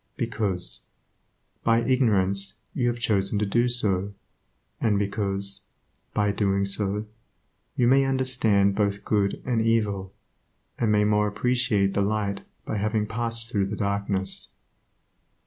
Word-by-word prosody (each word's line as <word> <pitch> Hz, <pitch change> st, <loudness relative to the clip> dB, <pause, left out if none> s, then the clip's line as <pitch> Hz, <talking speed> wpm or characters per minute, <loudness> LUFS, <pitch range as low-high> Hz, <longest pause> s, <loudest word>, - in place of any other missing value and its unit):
Because, 105 Hz, -7 st, -2 dB, 0.8 s
by 115 Hz, 0 st, +3 dB
ignorance, 100 Hz, -6 st, +2 dB, 0.2 s
you 125 Hz, -3 st, 0 dB
have 120 Hz, 0 st, 0 dB
chosen 105 Hz, -3 st, +1 dB
to 105 Hz, -, +1 dB
do 120 Hz, +5 st, +2 dB
so, 100 Hz, -5 st, 0 dB, 0.6 s
and 105 Hz, -3 st, +2 dB
because, 100 Hz, -1 st, -2 dB, 0.5 s
by 105 Hz, -1 st, +2 dB
doing 100 Hz, -1 st, +1 dB
so, 100 Hz, +1 st, 0 dB, 0.7 s
you 125 Hz, -, +2 dB
may 135 Hz, +2 st, +5 dB
understand 125 Hz, -7 st, +2 dB
both 100 Hz, 0 st, -1 dB
good 100 Hz, -2 st, 0 dB
and 120 Hz, -3 st, +1 dB
evil, 105 Hz, -4 st, 0 dB, 0.7 s
and 115 Hz, -2 st, +2 dB
may 105 Hz, 0 st, +4 dB
the 105 Hz, -, +2 dB
more 105 Hz, 0 st, +3 dB
appreciate 110 Hz, -3 st, +1 dB
the 100 Hz, -, +1 dB
light 100 Hz, -1 st, -1 dB, 0.2 s
by -, -, -2 dB
having 105 Hz, +1 st, 0 dB
passed 115 Hz, +1 st, -2 dB
through 100 Hz, -4 st, +1 dB
the 105 Hz, -, -4 dB
darkness. 100 Hz, -1 st, -1 dB
105 Hz, 130 wpm, -25 LUFS, 100-115 Hz, 0.8 s, may